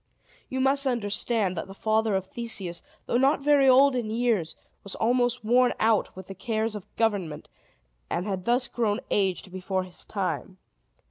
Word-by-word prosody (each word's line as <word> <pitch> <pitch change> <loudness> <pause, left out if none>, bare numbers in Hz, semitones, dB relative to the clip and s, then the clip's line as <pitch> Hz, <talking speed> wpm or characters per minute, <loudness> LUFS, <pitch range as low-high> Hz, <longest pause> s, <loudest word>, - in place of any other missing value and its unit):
You 260 - -3
must 275 +1 +2
understand 215 -4 0
that 165 - -4
the 195 - -11
father 220 0 +1
of 190 -1 -1
Theseus, 195 -6 -5 0.2
though 240 - +1
not 275 +3 +3
very 280 -2 +5
old 270 +1 +6
in 235 -3 -2
years, 220 -7 0 0.3
was 200 - -6
almost 245 0 +1
worn 245 +2 +4
out 220 -1 +2
with 190 0 -9
the 195 - -8
cares 220 +3 -2
of 205 -1 -9
government, 195 -9 -1 0.6
and 175 - -2
had 190 -3 -3
thus 245 +2 +2
grown 215 -4 -1
aged 190 -2 0
before 185 0 -2
his 180 -1 -7
time. 190 -1 -3
220 Hz, 165 wpm, -26 LUFS, 190-245 Hz, 0.6 s, old